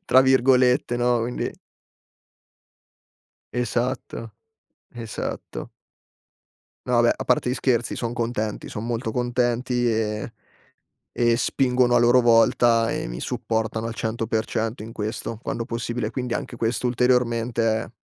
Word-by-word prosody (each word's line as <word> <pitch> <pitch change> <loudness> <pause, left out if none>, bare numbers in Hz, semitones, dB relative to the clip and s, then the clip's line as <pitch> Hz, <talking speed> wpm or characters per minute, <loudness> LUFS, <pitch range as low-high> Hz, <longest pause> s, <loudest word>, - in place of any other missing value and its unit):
tra 130 +1 +6
virgolette, 130 -1 +4
no? 120 -1 +2
Quindi 120 +2 -3 2.0
Esatto, 125 -1 -2 0.6
esatto. 115 -3 -6 1.2
No 125 -1 +2
vabbè, 120 0 +5
a - - -5
parte 125 0 +2
gli 125 - 0
scherzi, 120 -4 0
son 120 -1 -3
contenti, 115 -3 -3
son 105 - -5
molto 115 -1 -2
contenti 120 0 0
e 110 0 -1 0.8
e 120 -1 +3
spingono 125 0 +2
a - - +6
loro 120 +1 +5
volta 115 0 +4
e - - -2
mi - - -6
supportano 110 - -2
al 115 - -3
100% 110 0 -2
in 115 +1 -8
questo, 110 +1 -4
quando 115 - -3
possibile, 115 -1 -3
quindi 125 0 -3
anche 120 - -4
questo, 115 +2 0
ulteriormente, 120 -1 +1 0.2
è - - -12
120 Hz, 125 wpm, -24 LUFS, 115-125 Hz, 2.0 s, tra